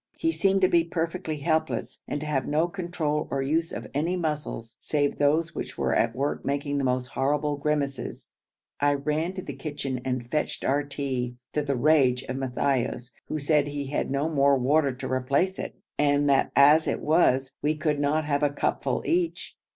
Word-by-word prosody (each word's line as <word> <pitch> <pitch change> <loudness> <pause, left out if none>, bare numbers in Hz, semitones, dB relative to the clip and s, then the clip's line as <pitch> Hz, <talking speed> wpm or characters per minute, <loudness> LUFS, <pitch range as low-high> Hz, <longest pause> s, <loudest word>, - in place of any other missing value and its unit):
He 330 - +1
seemed 195 -9 +2
to 185 - +6
be 170 -2 +4
perfectly 165 -1 -3
helpless, 160 +1 -1
and - - -2
to - - -4
have 145 -3 -1
no 155 +3 +2
control 170 -5 -2
or 135 0 -1
use 165 +4 0
of - - -5
any 160 +6 0
muscles 150 -8 -4
save 145 -2 0
those 155 +4 +2
which - - -6
were - - +1
at 115 -1 +1
work 140 +3 -1
making 140 0 -1
the - - -1
most 125 -1 0
horrible 145 +2 0
grimaces. 140 -1 -2 0.5
I 145 0 +3
ran 155 +5 -1
to 185 -1 -6
the - - -6
kitchen 140 -4 -4
and 125 -2 -3
fetched 150 - -1
our 140 +2 +2
tea, 135 -4 -3 0.2
to 150 - +1
the 140 -1 -1
rage 130 -2 +3
of 130 - -4
Matthaios, 130 -2 -1 0.2
who - - -2
said 150 0 +2
he 145 -1 -4
had - - -1
no 140 +3 0
more 140 -3 +3
water 140 +3 +2
to 125 - -6
replace 140 +9 0
it, - - -5 0.2
and 145 0 +3
that 135 - +2
as 150 +3 +6
it - - 0
was 135 -4 +3
we 150 +1 0
could 150 -1 0
not 150 +2 +1
have 145 -1 0
a 145 - +3
cupful 145 - -1
each. 345 0 -1
145 Hz, 190 wpm, -26 LUFS, 135-155 Hz, 0.5 s, to